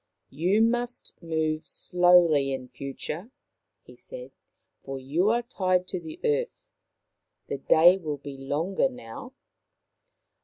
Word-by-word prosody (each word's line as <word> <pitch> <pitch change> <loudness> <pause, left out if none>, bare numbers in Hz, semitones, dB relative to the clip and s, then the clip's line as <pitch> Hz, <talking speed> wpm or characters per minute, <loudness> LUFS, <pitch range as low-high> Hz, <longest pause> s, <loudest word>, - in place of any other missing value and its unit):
" - - -54
You 180 +10 +2
must 240 +1 -1
move 160 -2 -1
slowly 175 -6 +4
in 130 -1 -6
future," 140 - -6 0.5
he - - -15
said, - - -9 0.3
" - - -53
for 135 0 -5
you 150 +10 +1
are 240 +2 +2
tied 185 -6 0
to 185 - -3
the 160 -2 -9
earth. 465 +1 -1 0.8
The 140 - -3
day 175 +7 +6
will 155 -4 -4
be 140 0 -9
longer 150 - 0
now." 260 +1 -10
175 Hz, 130 wpm, -27 LUFS, 145-230 Hz, 0.8 s, day